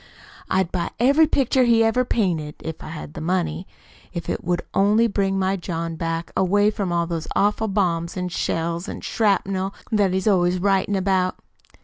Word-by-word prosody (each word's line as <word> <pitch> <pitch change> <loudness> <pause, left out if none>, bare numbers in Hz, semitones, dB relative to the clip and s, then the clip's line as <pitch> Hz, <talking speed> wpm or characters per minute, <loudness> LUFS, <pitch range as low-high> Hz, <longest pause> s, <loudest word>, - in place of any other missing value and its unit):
"I'd 190 -2 +1
buy 175 -2 -2
every 285 +6 +5
picture 265 -3 +2
he 230 -1 +4
ever 225 +3 +2
painted 170 -11 -1
(if 160 0 -6
I - - -8
had 155 -2 -8
the - - -7
money), 170 0 -1 0.5
if 170 -2 -4
't - - -3
would 175 0 -1
only 210 +4 +4
bring 195 -3 0
my 190 0 +1
John 165 -2 -4
back, 165 +1 -3
away 205 +3 +3
from 200 -4 -3
all 170 0 +1
those 165 -1 -4
awful 210 +2 +2
bombs 175 -4 -1
an' 180 0 -2
shells 170 0 -2
an' - - -6
shrapnel 195 -3 0 0.2
that 205 -4 +2
he's 190 +3 -1
always 180 -3 +3
writin' 195 +1 +1
about." 190 -1 +1
190 Hz, 175 wpm, -22 LUFS, 170-205 Hz, 0.5 s, every